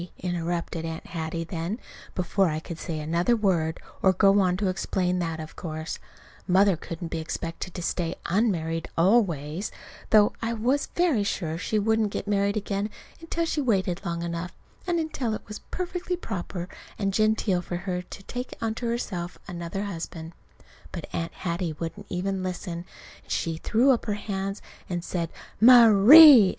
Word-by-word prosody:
interrupted 170 -2 -2
Aunt 165 0 -5
Hattie 165 0 -4
then, 170 +6 -4 0.4
before 185 +1 +2
I 155 0 -2
could 165 0 -8
say 160 -2 -4
another 170 +9 +1
word, 175 -7 +1 0.2
or 190 - +5
go 195 +2 +5
on 180 -2 +2
to 200 0 0
explain 185 -1 0
that 165 -2 -2
of 155 -1 -8
course 160 -1 -5 0.5
Mother 190 +1 +5
couldn't 165 +1 -6
be 165 - -3
expected 165 +2 -5
to 175 - -4
stay 170 0 -1
unmarried 170 -5 0
always, 170 -3 +2 0.4
though 210 -1 +5
I 230 0 -1
was 250 +6 +1
very 330 - +3
sure 165 -5 -2
she 215 +3 -1
wouldn't 220 0 +2
get 205 - -4
married 200 0 +1
again 200 0 -2 0.3
until 330 0 -2
she'd 315 -2 -1
waited 190 -8 +1
long 170 -2 -3
enough, 170 +1 -4 0.3
and 345 -1 +1
until 270 -8 -2
it - - -10
was 210 0 -7
perfectly 360 0 -3
proper 185 - -5 0.3
and 195 -2 -1
genteel 215 -3 +2
for 175 - -5
her 180 0 -3
to 185 +2 -11
take 245 +5 -6
unto 230 +1 -2
herself 185 -7 -3
another 175 +2 -4
husband. 165 -3 -6 0.6
But - - -5
Aunt 165 0 -3
Hattie 170 -2 -3
wouldn't 200 +5 -6
even 190 +1 -2
listen. 180 -2 -4 0.4
And - - -15
she 165 -1 -1
threw 235 +10 +3
up 245 - +1
her 210 -3 -1
hands 195 -1 -4 0.3
and 175 -2 -2
said 170 -3 -2 0.3
"Ma_rie_!" 240 +1 +10
185 Hz, 165 wpm, -26 LUFS, 170-215 Hz, 0.6 s, Ma_rie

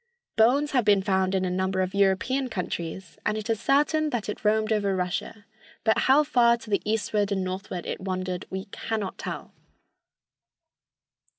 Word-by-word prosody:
Bones 270 +7 +3
have 250 -3 +2
been 205 -2 +4
found 190 -1 +1
in 190 0 +1
a 180 - -1
number 190 +1 -1
of 185 0 -2
European 200 +7 +1
countries, 180 -3 -5
and 210 0 0
it 215 +1 -2
is 225 - -1
certain 300 +4 +2
that 230 -6 -3
it 210 - -5
roamed 215 +1 +2
over 200 -2 +1
Russia, 185 +3 -3 0.4
but 220 -1 +3
how 285 +3 +6
far 240 -5 +4
to 225 -2 -12
the 200 -4 +2
eastward 210 -1 0
and 190 -1 0
northward 185 -1 -5
it - - -4
wandered 185 -1 -3
we 190 0 -4
cannot 215 -4 -4
tell. - - -6
205 Hz, 170 wpm, -26 LUFS, 190-225 Hz, 0.4 s, how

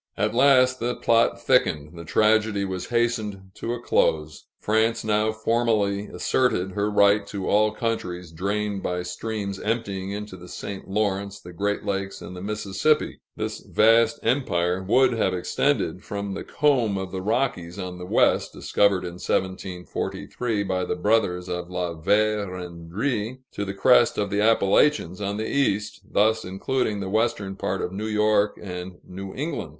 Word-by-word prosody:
At 105 +2 0
last, 130 0 +5
the 120 +1 -1
plot 115 0 +2
thickened; 75 +1 +1
the 85 - -8
tragedy 105 +2 +2
was 95 -1 -4
hastened 110 -5 -1
to 115 +3 -4
a - - -7
close. 75 -9 0
France 110 +2 +1
now 110 0 +2
formally 110 -2 0
asserted 105 -8 0
her 105 +2 -1
right 100 0 +4
to 100 -2 -4
all 105 +1 +3
countries 90 -7 -3
drained 100 +3 -2
by 90 -1 -2
streams 100 +2 -4
emptying 100 -4 -2
into 105 -1 -5
the 90 0 -12
St. 95 +2 -7
Lawrence, 100 -1 -1
the 90 - -11
Great 100 +4 -2
Lakes, 95 -1 -2
and 90 - -9
the 90 - -7
Mississippi. 105 +8 0 0.2
This - - -4
vast 115 +1 +3
empire 90 -8 +1
would 125 +8 +3
have 95 -5 +1
extended 90 0 0
from 100 -1 -4
the - - -5
comb 125 -9 +1
of 95 -1 -4
the 95 0 -4
Rockies 100 -5 -1
on 90 -2 -6
the 90 - -7
west - - +3
discovered 100 -3 +1
in 90 0 -7
1743 95 +4 -2
by 95 -1 -1
the - - -2
brothers 100 -5 +1
La 90 -1 -3
Vérendrye 105 - -1
to 105 - -4
the 95 -1 -4
crest 120 +3 +4
of 105 -1 -1
the 100 +1 +1
Appalachians 105 - +3
on 100 0 -2
the 110 - -2
east, 105 -6 0
thus 110 +2 +2
including 105 +3 -1
the 95 - -3
western 105 -2 0
part 95 -1 -2
of 90 - -3
New 105 +3 -4
York 105 -1 +2
and 90 -2 -6
New 95 +1 -8
England. 150 +5 -3
100 Hz, 155 wpm, -24 LUFS, 95-110 Hz, 0.2 s, last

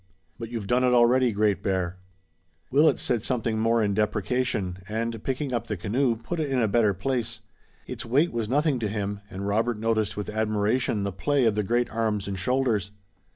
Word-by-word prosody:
"But 115 -1 -6
you've 115 -3 -4
done 125 +5 +2
it 125 -1 +4
already, 120 +1 +4
Great 100 -3 +1
Bear." 95 -2 -1 0.7
Willet 145 +2 +4
said 120 -3 0
something 115 -2 -1
more 115 0 +2
in 100 -1 +1
deprecation, 105 -2 -1
and 115 0 -3
picking 135 0 -2
up 115 -1 -2
the 105 - -3
canoe, 115 +7 +1
put 160 +10 -5
it 150 -2 -1
in 135 - 0
a 115 -3 +3
better 105 -1 +2
place. 120 +3 -2 0.4
Its - - -6
weight 145 +9 +2
was 115 -2 -2
nothing 145 0 +2
to 110 - -1
him, 100 -1 -3
and 100 0 -6
Robert 110 +3 0
noticed 110 -1 0
with 105 0 -4
admiration 110 +1 0
the 100 - -1
play 125 +9 +1
of 110 - +3
the 105 - 0
great 120 +4 0
arms 110 -3 -1
and 95 -1 -4
shoulders. 115 -2 0
115 Hz, 195 wpm, -26 LUFS, 105-125 Hz, 0.7 s, it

